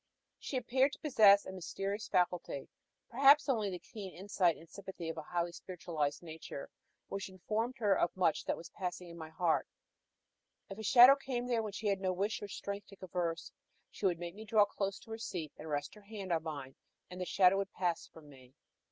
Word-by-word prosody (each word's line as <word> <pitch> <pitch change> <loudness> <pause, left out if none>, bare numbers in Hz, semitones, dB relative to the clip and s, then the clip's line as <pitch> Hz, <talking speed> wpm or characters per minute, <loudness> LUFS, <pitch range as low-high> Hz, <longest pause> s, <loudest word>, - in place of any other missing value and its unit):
She 270 - -3
appeared 260 +3 +2
to - - -9
possess 210 -9 +6
a - - -6
mysterious 195 +3 -4
faculty 175 -6 0 0.4
perhaps 280 +5 +6
only 220 -7 +1
the 180 - -4
keen 195 +1 -9
insight 185 -3 +1
and 165 - -14
sympathy 190 -3 -7
of 165 - -5
a - - -3
highly 175 +2 -2
spiritualized 170 -4 -3
nature 160 -4 -8 0.4
which 195 -1 -4
informed 215 +7 -2
her 210 -4 +3
of 170 - +2
much 170 -4 +2
that - - -1
was 170 - -10
passing 180 -1 -5
in 170 - -10
my 160 -1 -7
heart: 165 0 +1 1.0
if 195 - -7
a - - -5
shadow 250 +4 +9
came 260 -3 -3
there 240 -2 +1
when 215 -2 -5
she 215 - -6
had 200 -2 +1
no 185 -1 +1
wish 200 +4 -1
or 205 - -5
strength 200 0 -5
to 200 - -13
converse, 175 -3 -3 0.4
she 200 - 0
would 175 -3 +1
make 170 0 -6
me 215 +3 -9
draw 215 -1 +4
close 195 -1 -3
to 225 - -14
her 225 - -5
seat, 165 -9 -5
and 155 - -9
rest 145 -1 -2
her 210 - -14
hand 200 -2 -7
on 165 - +1
mine, 145 -5 -6 0.4
and 180 +1 -6
the - - -1
shadow 185 +1 +5
would 195 -1 -2
pass 175 -3 -1
from 155 -2 -15
me. 130 -2 -16
190 Hz, 210 wpm, -34 LUFS, 170-215 Hz, 1.0 s, shadow